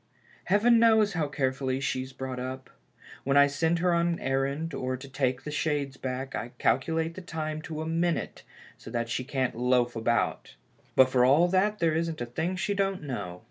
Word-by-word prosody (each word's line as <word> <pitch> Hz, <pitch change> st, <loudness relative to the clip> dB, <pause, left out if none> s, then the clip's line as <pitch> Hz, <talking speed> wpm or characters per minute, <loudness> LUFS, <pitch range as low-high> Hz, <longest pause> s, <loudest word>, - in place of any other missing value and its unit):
Heaven 225 Hz, +5 st, +4 dB
knows 220 Hz, -3 st, +4 dB
how 160 Hz, -4 st, 0 dB
carefully 130 Hz, -1 st, -1 dB
she's 130 Hz, -1 st, -2 dB
brought 130 Hz, -1 st, -5 dB
up. 130 Hz, +1 st, -6 dB, 0.5 s
When 140 Hz, +1 st, +2 dB
I 140 Hz, -, +8 dB
send 160 Hz, +4 st, 0 dB
her 175 Hz, +1 st, +2 dB
on 170 Hz, 0 st, +2 dB
an 170 Hz, -1 st, -1 dB
errand, 140 Hz, +4 st, -1 dB
or 130 Hz, 0 st, -2 dB
to 135 Hz, +2 st, -10 dB
take 130 Hz, -1 st, -1 dB
the 150 Hz, -, -5 dB
shades 145 Hz, -3 st, -1 dB
back, 130 Hz, 0 st, -4 dB
I 120 Hz, -, -5 dB
calculate 160 Hz, +7 st, +1 dB
the 185 Hz, -, -8 dB
time 155 Hz, -3 st, -4 dB
to 155 Hz, 0 st, -5 dB
a -, -, -6 dB
minute 165 Hz, +1 st, -1 dB, 0.4 s
so -, -, -10 dB
that 115 Hz, 0 st, -2 dB
she 130 Hz, -, -2 dB
can't 130 Hz, -1 st, -1 dB
loaf 125 Hz, 0 st, +1 dB
about, 115 Hz, 0 st, -1 dB, 0.4 s
but 130 Hz, -1 st, +6 dB
for 125 Hz, -1 st, +4 dB
all 145 Hz, +7 st, +5 dB
that 200 Hz, +3 st, +2 dB
there 165 Hz, -4 st, +2 dB
isn't 165 Hz, 0 st, -1 dB
a 120 Hz, -, -2 dB
thing 160 Hz, +10 st, -2 dB
she 190 Hz, +2 st, -1 dB
don't 195 Hz, -3 st, -1 dB
know. 90 Hz, -11 st, -5 dB
140 Hz, 195 wpm, -28 LUFS, 130-165 Hz, 0.5 s, I